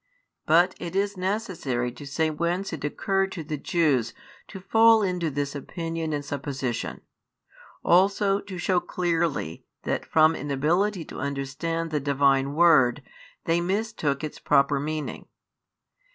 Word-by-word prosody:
But 175 +4 +5
it 175 +1 -6
is 200 +1 0
necessary 185 - -2
to 135 +4 -10
say 155 +3 0
whence 170 +5 -2
it 155 - -6
occurred 195 +6 0
to 165 - -5
the 155 0 -4
Jews 140 -6 +1 0.3
to 195 - -9
fall 225 +3 +5
into 180 -4 -1
this 145 0 -3
opinion 165 +2 -4
and 145 -1 -3
supposition; 135 -4 -4 0.8
also 195 +2 +3
to 200 -2 -8
shew 180 +1 +1
clearly 170 - -2 0.2
that - - -1
from 160 0 +4
inability 160 +7 0
to - - -9
understand 140 +4 -3
the 150 - 0
Divine 140 0 +2
Word, 150 -5 +4 0.4
they 170 +1 +2
mistook 185 - -1
its 155 - -5
proper 140 0 +3
meaning. 155 +1 -4
160 Hz, 135 wpm, -26 LUFS, 140-185 Hz, 0.8 s, But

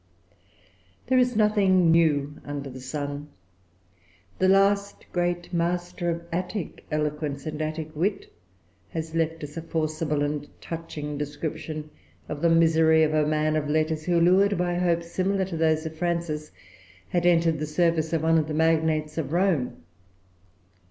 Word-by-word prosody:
There 260 0 +3
is 250 -1 +2
nothing 195 -5 +4
new 150 -3 +2
under 140 -1 -5
the 130 - -9
sun. 145 +2 -4 1.1
The 185 - +4
last 200 +1 +2
great 175 0 -1
master 175 +1 -1
of 170 0 -2
Attic 180 +2 -4
eloquence 150 -2 -2
and 155 0 -4
Attic 155 0 -4
wit 190 +6 -2 0.6
has 160 -1 -5
left 165 -1 -1
us 150 +2 -7
a - - -2
forcible 155 -2 -1
and 145 0 -3
touching 150 -3 -6
description 155 +1 -5 0.4
of 145 -1 -5
the 170 - +4
misery 160 -1 +5
of 155 0 +1
a 155 -1 +2
man 155 0 +1
of 150 -1 -1
letters, 155 0 0
who, 175 -1 +2
lured 195 +4 +4
by 175 0 0
hopes 170 -1 0
similar 190 +1 0
to 180 -2 -6
those 160 0 +1
of 160 0 -5
Frances, 165 -3 -2 0.6
had 175 0 +1
entered 165 -2 +3
the 155 - -2
service 160 0 +1
of 165 -2 0
one 165 0 +4
of 155 - -1
the 155 - -3
magnates 160 -1 +1
of 150 - -3
Rome. 170 - 0
160 Hz, 150 wpm, -26 LUFS, 150-175 Hz, 1.1 s, misery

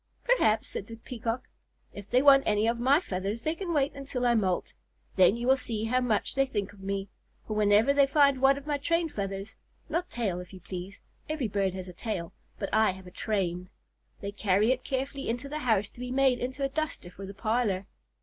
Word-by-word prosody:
"Perhaps," 350 - +3
said 200 - -5
the 230 - -8
Peacock. 230 +1 -4 0.5
"If 205 -1 -10
they 250 +2 +3
want 275 -1 +8
any 210 +1 +2
of 235 0 0
my 270 +5 +5
feathers, 200 - -3
they 315 - 0
can 350 +1 -4
wait 285 -3 +1
until 270 -2 -3
I 240 - +4
moult. 190 -6 0 0.4
Then 190 +3 +5
you 240 - -3
will 265 +1 +6
see 225 -5 -4
how 250 +3 +1
much 225 -5 0
they 270 0 +2
think 205 -5 -3
of 205 - -17
me, 195 0 -3 0.4
for 215 - -4
whenever 210 +5 +4
they 280 -1 +5
find 280 -2 +4
one 270 +1 +5
of 280 - -9
my 295 -1 -1
train 335 +3 +1
feathers 195 -2 -4 0.4
(not 345 +2 -1
tail, 200 -7 -2
if 180 +1 -10
you 190 - -9
please; 185 +2 -7 0.3
every 305 -6 -1
bird 195 -2 0
has 185 -1 -6
a 180 - -9
tail, 175 -4 -4 0.2
but 195 - -3
I 220 0 +5
have 190 0 -12
a 180 - -11
train) 185 -3 -2 0.5
they 200 - -4
carry 205 +2 +2
it 255 0 -1
carefully 270 0 -3
into 240 +4 -2
the 300 +2 -4
house 220 -7 +2
to - - -17
be 250 0 -4
made 260 -1 +3
into 260 +2 -3
a 275 - +1
duster 305 - -3
for 195 +1 -9
the 195 - -9
parlor. 215 -3 0
230 Hz, 220 wpm, -29 LUFS, 200-270 Hz, 0.5 s, want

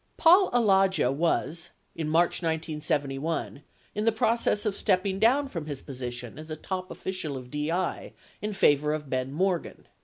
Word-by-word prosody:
Paul 365 +3 +6
Alagia 195 - +3
was, 165 +2 0 0.3
in 160 -2 -3
March 170 +3 +2
1971, 155 -2 -2 0.3
in 210 - -2
the 225 - +5
process 220 -1 +1
of 210 -2 0
stepping 190 -1 +1
down 265 +6 +4
from 165 - -6
his 145 -3 -5
position 125 -1 -6
as 155 +1 -10
a 155 - -3
top 185 +3 -5
official 160 -7 -4
of 125 -1 -10
DI 165 +5 -2 0.3
in 210 0 -3
favor 150 -5 +3
of 150 -3 -5
Ben 130 0 -1
Morgan. 180 +3 -1
165 Hz, 155 wpm, -27 LUFS, 150-195 Hz, 0.3 s, Paul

